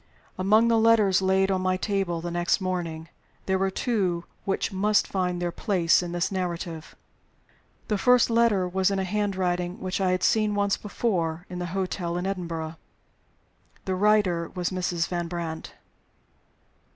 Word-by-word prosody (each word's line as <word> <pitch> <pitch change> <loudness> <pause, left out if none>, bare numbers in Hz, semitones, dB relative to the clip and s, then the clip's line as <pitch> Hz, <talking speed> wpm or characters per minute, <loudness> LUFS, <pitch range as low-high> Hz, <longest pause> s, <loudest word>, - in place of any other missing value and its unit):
Among 215 +5 +4
the 230 -1 +3
letters 220 -4 +4
laid 190 +1 +2
on 190 -1 0
my 185 0 +1
table 190 -4 -1
the 175 +1 -4
next 175 +3 +1
morning 170 -4 -3 0.4
there 190 0 +1
were 195 0 +1
two 190 -5 -1 0.2
which 195 - -1
must 205 +2 +2
find 180 -2 -1
their 175 0 -1
place 180 -4 +2
in 175 -1 -5
this 175 +2 -1
narrative. 170 -3 -4 0.9
The 210 -2 0
first 250 0 +4
letter 230 -5 +3
was 190 +1 +1
in 195 - -1
a 190 - 0
handwriting 185 -3 -1
which 185 +1 -3
I 190 - +2
had 185 0 0
seen 215 -2 +2
once 200 -1 +2
before, 180 -6 -2
at 180 - -5
the 175 - -3
hotel 180 -2 -2
in 180 - -3
Edinburgh. 165 -4 -4 1.1
The 190 - -1
writer 185 -4 +2
was 180 0 -1
Mrs. 175 -2 -1
Van 175 -1 -3
Brandt. 165 -2 -5
185 Hz, 160 wpm, -26 LUFS, 175-200 Hz, 1.1 s, Among